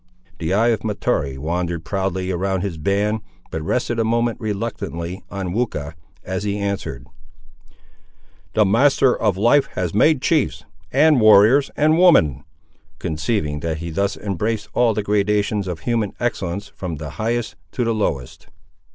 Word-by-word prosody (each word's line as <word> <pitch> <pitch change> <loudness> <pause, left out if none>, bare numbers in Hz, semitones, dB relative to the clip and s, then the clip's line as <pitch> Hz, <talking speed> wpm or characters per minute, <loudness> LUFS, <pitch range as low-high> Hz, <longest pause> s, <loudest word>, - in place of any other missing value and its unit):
The 80 +1 -2
eye 110 +5 +3
of 110 -3 0
Mahtoree 85 -10 -1
wandered 85 +2 -3
proudly 95 +1 -2
around 95 +1 -1
his 90 -5 -4
band, 100 +6 0 0.3
but 80 - -3
rested 120 +7 -1
a - - +3
moment 115 +1 0
reluctantly 100 -5 -4
on 95 -3 -4
Weucha, 80 -10 -2 0.3
as 95 +2 -3
he 100 0 -1
answered— 100 -11 -3 1.5
"The 110 -1 +5
Master 130 +5 +4
of 105 -4 0
Life 120 +8 +4
has 90 -3 -2
made 145 +8 +4
chiefs, 150 +2 0 0.3
and 145 -1 +4
warriors, 110 +6 +6
and 155 +2 +3
women;" 75 - +5 0.5
conceiving 80 -2 -2
that 80 0 -3
he 85 +1 -6
thus 100 +5 -1
embraced 105 +2 -2
all 120 -3 +3
the 105 - -1
gradations 105 0 +1
of 85 -3 -5
human 115 0 -1
excellence 100 -5 -2
from 90 -4 -6
the 75 0 -7
highest 115 +1 -1 0.2
to 125 - -1
the 115 -1 +1
lowest. 75 - -3
100 Hz, 150 wpm, -21 LUFS, 85-115 Hz, 1.5 s, warriors